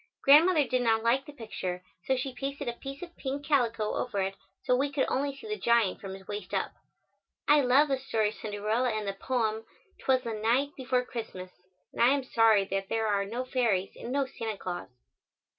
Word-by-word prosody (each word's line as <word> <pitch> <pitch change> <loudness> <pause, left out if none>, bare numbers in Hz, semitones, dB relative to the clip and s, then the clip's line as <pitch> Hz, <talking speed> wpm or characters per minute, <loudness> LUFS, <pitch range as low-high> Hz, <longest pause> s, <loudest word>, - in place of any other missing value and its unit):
Grandmother 310 +3 +7
did 255 0 +1
not 225 -2 +2
like 245 +4 +2
the - - -8
picture, 190 -8 -5 0.2
so 265 - +2
she 255 +1 -3
pasted 275 +1 -5
a 240 - -1
piece 275 +5 -8
of 345 -1 -10
pink 280 +1 -4
calico 235 -7 +1
over 235 -5 -2
it, 190 +1 -2 0.3
so 250 - +3
we 275 +2 0
could 275 -2 +1
only 280 +1 -1
see 355 - -11
the 425 0 -3
giant 235 -5 +2
from 190 -1 -6
his 190 0 -14
waist 205 -2 -5
up. - - -1 0.8
I 295 0 +6
love 270 +3 +5
the 270 -2 0
story 220 -5 0
of - - -8
Cinderella 215 +4 -1
and 215 -2 -2
the 195 - -1
poem, 220 0 -1 0.4
"'Twas 260 -1 +2
the 230 - -3
night 235 +6 +1
before 255 -1 0
Christmas," 190 -7 -7 0.4
and - - -3
I 235 - +7
am 280 - -2
sorry 225 -5 +4
that 195 0 -3
there 225 0 0
are 200 -2 +1
no 240 +5 -4
fairies 225 -8 0
and 240 - -7
no 280 0 +1
Santa 225 -5 -5
Claus. 175 -2 -5
240 Hz, 210 wpm, -29 LUFS, 215-270 Hz, 0.8 s, Grandmother